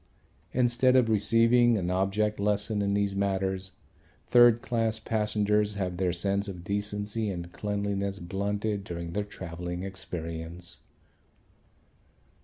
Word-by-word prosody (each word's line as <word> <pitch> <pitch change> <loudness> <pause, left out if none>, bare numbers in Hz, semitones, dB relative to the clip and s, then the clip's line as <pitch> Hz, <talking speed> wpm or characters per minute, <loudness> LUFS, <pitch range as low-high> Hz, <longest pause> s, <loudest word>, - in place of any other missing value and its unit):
Instead 125 +1 +3
of 125 -3 +4
receiving 115 +2 +4
an 90 -2 -1
object 100 +3 0
lesson 105 +1 0
in 100 0 +1
these 100 -1 0
matters 95 -1 -1 0.5
third 120 -1 +6
class 115 -2 0
passengers 105 -1 0
have 90 -3 -2
their 90 -1 +1
sense 100 +3 0
of 90 -3 -7
decency 105 +2 -2
and 85 -2 -5
cleanliness 100 -1 -2
blunted 100 +3 -2
during 85 -2 -6
their 105 - 0
travelling 90 -2 -6
experience. 85 -2 -6
100 Hz, 115 wpm, -28 LUFS, 95-105 Hz, 0.5 s, third